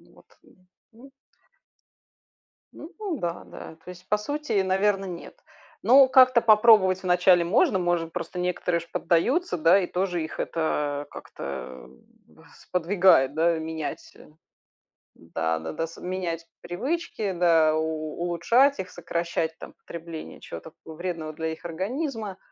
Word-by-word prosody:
Вот - - -22 0.2
и, - - -23 0.4
м 255 +5 -16 1.6
Ну 315 - -11 0.3
да, 170 0 -4
да. 160 - -11
То - - -15
есть 180 0 -13
по 210 - +3
сути, 290 -2 -2
наверно, 195 +1 +1
нет. 175 -2 -9 0.4
Ну 265 +1 +7
как-то 255 -2 +6
попробовать 210 -4 +5
вначале 180 -1 +4
можно, 195 - +3
может 175 -2 -1
просто 180 0 -5
некоторые 180 -1 -1
ж 170 - -13
поддаются, 265 - +1
да. 170 +4 +5
И 180 - -2
тоже 180 -2 -2
их 160 - -8
это 145 -3 -2
как-то 65 -1 -8 0.4
в - - -21
сподвигает, 175 -6 +3
да, 165 +1 +2
менять, 160 - -6
э - - -16 0.9
да-да-да 80 - -3
с 165 - -13
менять 175 -3 -4 0.2
привычки. 220 - -3
Да, 165 -3 +3
у 155 0 -3
улучшать 230 +11 +3
их, 185 -1 -4
сокращать 170 -1 -3
там - - -11
потребление 165 -1 -9
чего-то 160 - -9
такого 160 0 -13
вредного 165 -3 -5
для 160 +1 -4
их 160 +1 -6
организма. 210 - -4
175 Hz, 135 wpm, -25 LUFS, 160-205 Hz, 1.6 s, Ну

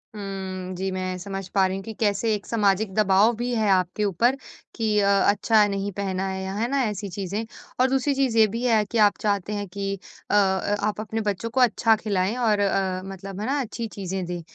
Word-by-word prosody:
हुँ 190 -2 -5
जी, 190 +2 -2
मैं 185 0 -3
समझ 195 +1 -6
पा 195 -1 +5
रही 190 +1 -3
हूँ 195 - -7
कि 220 +2 -7
कैसे 215 +1 +1
एक 205 - -7
सामाजिक 205 -2 +1
दबाव 210 +2 +4
भी 240 +2 -2
है 215 -2 +1
आपके 185 +2 +1
ऊपर 230 +7 +2 0.4
कि 215 -2 +1
अ, 200 - +2 0.2
अच्छा 210 +1 +4
नहीं 200 0 -2
पहना 195 -1 -2
है 190 0 -4
या 190 - -4
है 225 +3 0
ना, 275 -1 +2
ऐसी 210 -3 -3
चीज़ें? 200 +4 -4 0.3
और 255 +1 +4
दूसरी 270 +2 +1
चीज़ 265 -4 +1
ये 220 - +7
भी 230 +4 -4
है 225 -3 +4
कि 235 - -1
आप 205 - -3
चाहते 205 -1 0
हैं 205 -1 -3
कि 195 +1 -3 0.4
अ, - - -1
अ 195 0 +2
आप 210 0 -2
अपने 220 +1 -3
बच्चों 210 +2 -2
को 260 +3 +1
अच्छा 225 -1 +4
खिलाएँ। 205 -1 -1
और 220 -4 +2
अ, 190 -2 0
मतलब 195 0 -8
है - - -2
ना 285 +2 0
अच्छी 230 -1 -4
चीज़ें 190 -2 -4
दें। 175 0 -4
205 Hz, 225 wpm, -24 LUFS, 190-220 Hz, 0.4 s, ये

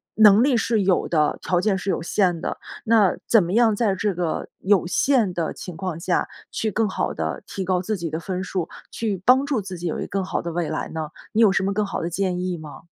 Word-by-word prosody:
能 215 +1 +7
力 270 -3 +3
是 225 -2 +1
有 185 -1 +2
的， 155 -3 +1
条 180 -1 +1
件 210 -1 +2
是 190 +1 -4
有 - - +1
限 180 -2 +1
的， - - -3 0.3
那 220 -4 +4
怎 225 -5 +5
么 175 +3 -3
样 225 -2 +4
在 205 -3 +1
这 200 +1 0
个 175 -2 -2
有 195 -2 +3
限 235 -2 +2
的 170 -2 -2
情 180 - -8
况 180 -3 -4
下 175 +1 0 0.2
去 220 - -1
更 220 +2 +1
好 - - -1
地 80 0 -3
提 195 - -4
高 180 0 +1
自 215 +2 -2
己 170 -2 -4
的 160 - -2
分 185 +1 -4
数， 180 -3 -3 0.2
去 210 -5 -2
帮 260 +2 +5
助 270 -6 +1
自 185 -1 -7
己 175 - -3
有 - - -2
一 - - -2
更 195 0 -2
好 190 - -2
的 170 - -3
未 170 -1 -2
来 155 - -3
呢？ 160 -2 -4 0.2
你 225 - +3
有 215 - +6
什 190 0 +1
么 195 +1 0
更 210 - +1
好 - - -4
的 170 - -2
建 185 0 -1
议 180 -1 -2
吗？ 155 -1 -10
190 Hz, 270 characters per minute, -23 LUFS, 175-215 Hz, 0.3 s, 能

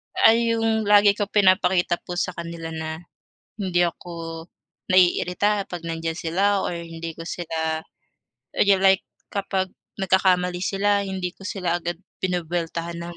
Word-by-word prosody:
Ay 230 +1 +5
yung 225 -1 +1
lagi 205 -1 +6
ko 210 - -1
pinapakita 185 -3 +3
po 175 0 -4
sa 185 - -2
kanila 170 -1 -6
na 160 0 -5 0.6
hindi 185 -4 +1
ako 165 -1 -7 0.5
naiirita 185 +3 +3
'pag 175 -2 -5
nandiyan 165 0 -3
sila 195 +4 +1
or 175 - -2
hindi 165 -1 -7
ko 165 - -8
sila 160 -2 -2 0.8
you 200 -1 +6
like 190 -1 +5 0.3
kapag 190 -2 -1 0.3
nagkakamali 180 -1 +2
sila 200 +1 +2
hindi 190 -2 -3
ko 195 - -13
sila 175 -3 -1
agad 175 0 -3 0.3
binubweltahan 170 -1 -2
ng, 170 0 -7
180 Hz, 135 wpm, -24 LUFS, 170-195 Hz, 0.8 s, lagi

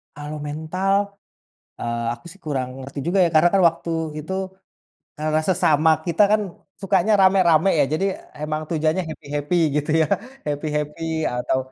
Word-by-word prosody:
Kalau 150 +1 -6
mental, 160 +6 -1 0.9
eee, 120 0 -2
aku, 120 - -19
sih, 195 - -19
kurang 135 -5 -2
ngerti 135 +2 -8
juga, 180 +3 +1
ya, 170 - +1
karena, 155 +3 +6
kan, 195 - +5
waktu 165 +1 -6 0.3
itu, 160 +5 -7 0.9
eee, 155 0 +1
sesama 160 -3 +3 0.2
kita, 170 +4 +3
kan, 215 - +4 0.4
sukanya 195 +1 +2
ramai-ramai, 185 -2 +5
ya, 145 - +5
jadi 160 - 0 0.4
emang 155 0 -2
tujuannya 160 +3 +1
happy-happy 145 +2 -3 0.2
gitu 150 +1 -2
ya, - - +2 0.4
happy-happy 150 +2 -2
atau 125 +2 -1
155 Hz, 145 wpm, -22 LUFS, 150-175 Hz, 0.9 s, karena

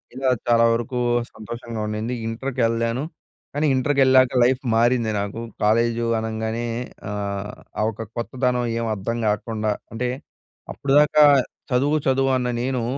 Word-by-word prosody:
ఇలా 130 0 0 0.2
చాలా 115 -1 +5
వరకు 120 +2 -2 0.3
సంతోషంగా 115 +1 -7
ఉండింది. 110 +3 -3
ఇంటర్‌కెళ్ళాను, 115 0 -1 0.5
కానీ 145 +2 0
ఇంటర్‌కెళ్ళాక 130 -1 +4
లైఫ్ 130 +1 +2
మారింది 115 -1 +2
నాకు. 100 +3 -4 0.2
కాలేజు 115 +2 +2
అనంగానే 110 +1 -3 0.5
ఆహ్, 100 0 -4 0.3
ఆ - - +1
ఒక 110 +1 -8
కొత్తదనం 125 0 -1
ఏమి 115 -1 -2
అర్థం 115 +4 -3
కాకుండా 105 0 -1 0.2
అంటే, 125 +2 -2 0.6
అప్పుడు 140 -1 -1
దాకా 150 0 +5 0.5
చదువు, 140 +5 +2
చదువు 135 0 +2
అన్న 125 -1 -1
నేను 130 -1 -1
120 Hz, 125 wpm, -22 LUFS, 110-130 Hz, 0.6 s, చాలా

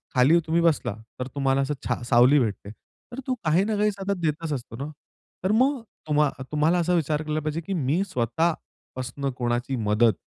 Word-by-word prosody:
खाली 140 +7 +5
तुम्ही 170 +1 +2
बसला, 160 -10 +2 0.3
तर 125 - -3
तुम्हाला 135 -1 +2
असं 140 +2 -1
छा 120 -1 -1
सावली 125 +4 +6
भेटते. 105 -3 -2 0.4
तर 250 - -6
तू 255 - +1
काही 165 +5 +3
ना 215 -1 0
काही 210 0 +2
सतत 200 0 -3
देतच 155 0 -1
असतो 120 -3 -6
ना. 140 +2 -4 0.6
तर 190 - +2
मग 260 +3 +3 0.3
तुम्हा 150 -1 +3 0.2
तुम्हाला 155 +4 +2
असा 175 +1 +1
विचार 155 -2 +1
केला 155 0 -1
पाहिजे, 155 +2 -2
की 195 +4 -4
मी 160 +3 +1
स्वतःपासन 130 0 -2
कोणाची 120 +2 -1
मदत, 110 0 +3
150 Hz, 180 wpm, -25 LUFS, 130-170 Hz, 0.6 s, सावली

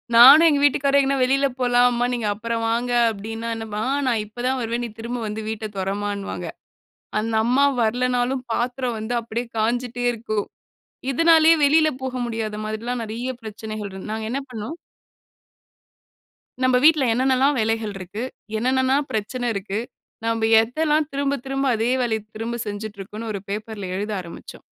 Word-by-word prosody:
நானும் 275 +8 +10
எங்க 290 -2 +2
வீட்டுக்காரரும் 280 0 +4
எங்க 275 0 +1
வெளியில 275 +2 +2
போலாம். 245 0 +4
அம்மா 240 0 0
நீங்க 230 -3 -1
அப்புறம் 230 +2 -3
வாங்க. 240 +2 0 0.2
அப்டின்னா, 225 +2 -5 0.6
நான் 230 -3 +1
இப்ப 215 +3 -9
தான் 260 0 0
வருவேன். 235 +1 -2
நீ - - -6
திரும்ப 240 +2 -4
வந்து 215 +1 -4
வீட்டை 220 0 -4
தொறம்மான்பாங்க. 200 +1 -3 0.7
அந்த 225 +1 -2
அம்மா 265 +4 +4 0.2
வரல்லைனாலும் 250 +3 0
பாத்திரம் 245 0 -1
வந்து 220 +3 -3
அப்டியே 235 +1 -4
காஞ்சுட்டே 245 +2 -1
இருக்கும். 215 -3 -3 0.7
இதனாலயே 325 +3 +6
வெளியில 310 +2 +5
போக 260 -1 -3
முடியாத 220 -2 -3
மாதிரில்லாம் 230 +3 -3
நெறைய 235 +4 -4
பிரச்சனைகள் 215 -1 -6
இரு 190 - -8
நாங்க 220 0 -3
என்ன 275 +3 -1
பண்ணினோம். 245 +7 -6 1.9
நம்ம 255 -1 +4
வீட்டுல 305 -5 +6
என்ன 255 +3 +1
என்னலாம் 265 +2 +3
வேலைகள் 220 -1 -1
இருக்கு? 190 +5 -6 0.4
என்னென்னலாம் 260 +4 +2
பிரச்சனை 230 +4 -2
இருக்கு? 200 +1 -3 0.5
நம்ம 225 -1 +1
எதெல்லாம் 300 +5 +1
திரும்ப 280 0 0
திரும்ப 270 0 -1
அதே 225 +3 0
வேலைய 220 -2 0 0.2
திரும்ப 230 +2 -3
செஞ்சிட்டுருக்கோம்னு 210 +1 -6
ஒரு 200 - -4
பேப்பர் 210 +1 -5
ல 185 - -4
எழுத 210 +2 -3
ஆரம்பிச்சோம். 170 -1 -11
235 Hz, 150 wpm, -23 LUFS, 220-260 Hz, 1.9 s, நானும்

